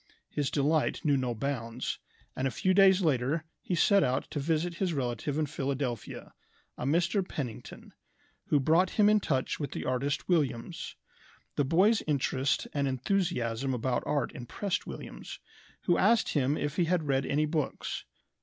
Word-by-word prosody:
His 145 -3 -1
delight 150 +3 +1
knew 145 -2 +4
no 125 -3 -1
bounds, 120 -1 -3 0.4
and 130 - 0
a - - +1
few 185 +11 +1
days 190 0 +6
later 145 +1 +1 0.2
he 180 - -2
set 200 +3 +4
out 130 +1 0
to - - -2
visit 165 +4 0
his 185 -4 0
relative 130 +2 -2
in 155 - +1
Philadelphia, 135 -5 -4 0.4
a - - -5
Mr. 175 +6 +2
Pennington, 130 -10 -7 0.5
who 145 - +3
brought 165 +7 +3
him 210 -2 +6
in 210 0 +5
touch 135 -9 -1
with 145 - -4
the - - -4
artist 130 +3 -1
Williams. 150 -3 -1 0.6
The 145 - +2
boy's 195 - +4
interest 135 -2 0
and 140 -1 0
enthusiasm 130 - 0
about 125 +1 0
art 145 -2 0
impressed 175 - -3
Williams, - - -8 0.4
who 175 - +2
asked 225 +3 +4
him 145 0 +1
if 145 +2 -3
he 175 - +3
had 175 0 +1
read 135 -2 +1
any 150 +2 +2
books. 150 -1 -2
145 Hz, 160 wpm, -30 LUFS, 130-170 Hz, 0.6 s, days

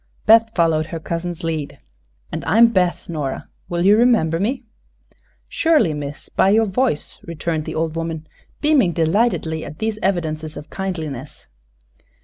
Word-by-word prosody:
Beth 225 +1 +6
followed 160 -2 +2
her 165 - -5
cousin's 170 +1 -4
lead. 160 -3 -3 0.5
"And - - -4
I 210 - +2
am 235 0 +8
Beth, 180 -5 0
Nora. 150 -5 -4 0.2
Will 175 0 -1
you 205 +2 +7
remember 215 -9 +3
me?" 250 +6 -1 0.8
"Surely, 315 - +2
miss; 145 0 -6
by 190 - +2
your 220 +2 +4
voice," 210 - -1
returned 165 -1 -3
the - - -5
old 160 0 -1
woman, 165 -1 -4 0.4
beaming 285 - +3
delightedly 165 -2 +1
at 150 - -9
these 220 +1 -2
evidences 160 -4 -2
of 150 - -10
kindliness. 155 - -5
170 Hz, 145 wpm, -20 LUFS, 155-215 Hz, 0.8 s, am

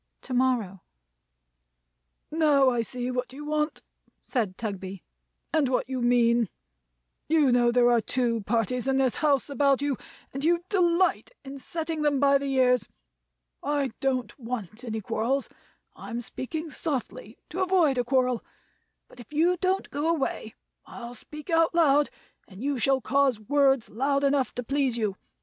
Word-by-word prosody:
To 260 - -6
morrow. 245 -7 +1 1.5
"Now 295 -4 +4
I 240 -1 0
see 245 +3 -3
what 250 0 -3
you 290 +3 -9
want," 300 +1 -1 0.4
said 215 -8 -2
Tugby; 195 -4 -5 0.5
"and 305 -5 +2
what 255 -1 0
you 260 -1 -3
mean. 240 -2 +3 0.8
You 305 -5 +4
know 240 -1 +4
there 245 0 +4
are 235 -1 +4
two 235 0 0
parties 230 +4 -1
in 270 0 +2
this 265 -2 +2
house 285 -5 +2
about 280 -1 +2
you, 285 -3 -1 0.4
and 275 +1 -5
you 340 +2 +2
delight 360 -2 +2 0.2
in 275 +1 -8
setting 320 +2 -4
them 290 -2 +2
by 280 0 +4
the 275 0 -3
ears. 250 -2 +3 0.7
I 285 -3 -1
don't 260 -2 -1
want 230 -2 -6
any 220 -2 -4
quarrels; 250 +7 -1 0.5
I'm 235 - -6
speaking 310 +7 -5
softly 255 -8 -4
to 365 +5 -3
avoid 355 -8 +3
a - - +2
quarrel; 250 -1 +1 0.6
but - - -18
if 240 - -12
you 330 +4 +3
don't 375 +2 -1
go 295 +3 -1
away, 275 -8 -2 0.3
I'll 235 0 -8
speak 300 +7 -9
out 330 0 +3
loud, 295 -3 +4 0.4
and 195 +4 -10
you 280 -2 -1
shall 265 +3 +2
cause 270 -1 +2
words 270 +2 +2
loud 275 +5 0
enough 275 -2 +2
to 245 - -3
please 270 -1 0
you. 210 -4 -1
265 Hz, 155 wpm, -27 LUFS, 240-290 Hz, 1.5 s, Now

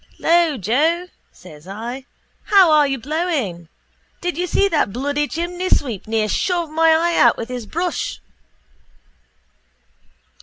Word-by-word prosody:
—Lo, 335 -3 +2
Joe, 315 - 0 0.2
says 160 -2 -15
I. 235 +7 -6 0.4
How 385 -5 +5
are 300 -2 +5
you 270 -1 -2
blowing? 265 - -3 0.5
Did 355 -2 -3
you 355 +3 -2
see 400 +3 +2
that 305 - 0
bloody 285 +5 -1
chimneysweep 335 - -2
near 220 -1 0
shove 345 - -1
my 325 +1 +3
eye 335 +2 +3
out 240 - +5
with 230 - -6
his 245 -3 -6
brush? 345 - -3
295 Hz, 125 wpm, -20 LUFS, 230-345 Hz, 0.5 s, How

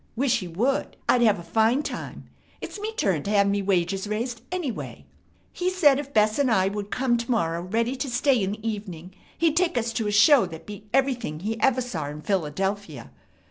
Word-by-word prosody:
Wish 250 -1 +2
he 185 - -6
would. 235 +12 -1
I'd 245 - +4
have 215 -3 +4
a 170 - -8
fine 225 - +2
time. - - -6 0.3
It's - - -7
me 430 +2 -3
turn 190 - 0
to 200 - -5
have 200 -1 +3
me 200 0 +1
wages 190 0 0
raised, 230 +3 -3
anyway. 345 -10 -5 0.5
He 360 +1 -1
said 300 -7 +4
if 280 -1 -6
Bess 215 0 +2
and 275 -3 +3
I 190 -4 +3
would 205 0 -5
come 250 0 +1
to 235 +1 -5
morrow 170 -8 0
ready 230 +7 -1
to 270 +1 -3
stay 250 0 +2
in 195 +1 -1
the 215 +1 -6
evening, 190 -5 -6 0.2
he'd 330 -2 +2
take 350 -2 +1
us 230 0 -1
to 225 -2 -1
a - - 0
show 220 +2 +6
that 160 -2 -10
beat 210 0 -10
everything 250 - 0
he 220 +2 -3
ever 260 0 +3
saw 175 - -4
in 150 +1 -8
Philadelphia. 190 - -2
215 Hz, 210 wpm, -25 LUFS, 190-255 Hz, 0.5 s, show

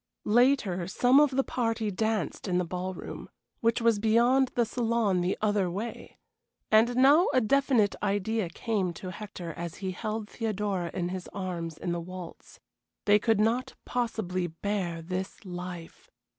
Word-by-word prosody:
Later 220 -7 +3
some 250 +8 +4
of 295 -1 +5
the 270 0 +1
party 225 -4 -1
danced 215 -3 -1
in 180 -1 +1
the 180 - +1
ballroom, 180 +2 -6 0.3
which 230 +1 +1
was 230 -2 +3
beyond 240 +5 +4
the 240 - +3
saloon 225 -5 +1
the 180 +2 0
other 205 -3 +2
way, 205 +7 -6 0.5
and 225 +3 +5
now 280 +7 +6
a 255 - +5
definite 250 -3 +3
idea 205 0 0
came 190 -1 -1
to 180 +2 -7
Hector 180 -4 -7
as 170 0 -6
he 190 -1 -4
held 215 +3 -4
Theodora 205 -6 -2
in 175 -1 -2
his 185 -1 -5
arms 170 -4 -4
in 175 - -3
the 170 0 -2
waltz. 180 0 -10 0.5
They 210 0 +5
could 225 -1 +2
not 240 +5 +1
possibly 205 -7 -1
bear 175 0 -3
this 185 +4 -5
life. 180 -2 -8
205 Hz, 155 wpm, -28 LUFS, 180-230 Hz, 0.5 s, now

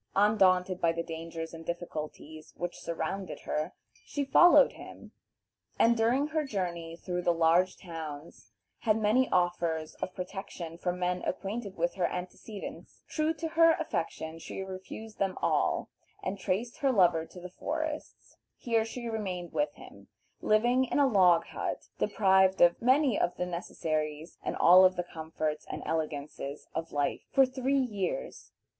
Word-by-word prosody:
Undaunted 190 -3 +3
by 165 - +4
the 170 0 -3
dangers 165 0 -6
and 165 0 -8
difficulties 155 -2 -6
which 175 0 -4
surrounded 170 +3 -4
her, 155 +4 -3 0.3
she 285 -1 -3
followed 350 - +7
him, - - -12 0.7
and 235 +1 +5
during 235 +5 +2
her 310 0 -1
journey 175 - -3
through 180 0 -3
the 175 - +2
large 170 +2 +3
towns 160 -3 -8 0.3
had 220 -2 +2
many 225 +4 +3
offers 170 -3 0
of 185 - -4
protection 180 -3 -6
from 175 +1 -2
men 180 0 -1
acquainted 200 +2 -4
with 170 +1 0
her 180 -3 +1
antecedents. 185 +3 -8
True 310 0 0
to 320 +1 -4
her 330 0 +6
affection, 165 - -3
she 190 - -6
refused 190 +3 -8
them 195 -1 0
all, - - +1 0.3
and 195 +1 -3
traced 220 +6 -2
her 275 -2 +2
lover 175 -7 +4
to 180 - -12
the 180 - -7
forests. 310 - -5 0.2
Here 230 -2 +1
she 235 +2 -6
remained 190 -6 -4
with 295 - +1
him, - - -14 0.3
living 240 +4 +3
in - - -2
a 285 - +5
log 185 -9 +5
hut, - - -5
deprived 190 -2 +3
of 175 0 +5
many 260 0 +3
of 175 - 0
the 180 - -1
necessaries 155 -3 -3
and - - -3
all 180 +2 +8
of 185 0 +5
the 175 - -1
comforts 155 -2 -4
and - - -5
elegances 150 -2 -4
of 165 +1 -4
life, 145 -1 -1
for 270 - +6
three 260 +1 0
years. 255 - -3
185 Hz, 155 wpm, -30 LUFS, 165-225 Hz, 0.7 s, all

